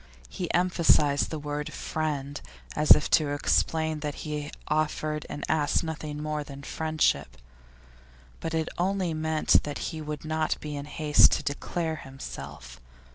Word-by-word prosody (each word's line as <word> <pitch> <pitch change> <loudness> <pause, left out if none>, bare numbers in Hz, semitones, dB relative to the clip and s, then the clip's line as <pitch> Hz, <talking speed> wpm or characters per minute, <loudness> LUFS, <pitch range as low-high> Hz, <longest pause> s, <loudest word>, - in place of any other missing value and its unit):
He - - -3
emphasised 165 -5 +3
the 160 - -3
word 150 0 -4
'friend,' 145 -3 -3 0.3
as 150 0 0
if 150 - +2
to 155 -3 +4
explain 160 +1 +1
that 150 -1 -3
he 150 -1 -4 0.2
offered 155 0 -1
and 145 - -4
asked 155 0 +2
nothing 150 -2 -5
more 150 -1 -2
than 140 -1 -10
friendship. 155 - 0 1.0
But 165 0 -3
it 160 -1 0
only 185 -1 +1
meant 155 0 +3
that 145 -1 -5 0.2
he 160 - -5
would 150 0 -5
not 155 0 0
be 150 -1 -5
in 140 0 -5
haste 150 0 +5
to - - -1
declare 160 +3 -2
himself. 70 - -9
150 Hz, 145 wpm, -28 LUFS, 145-160 Hz, 1.0 s, haste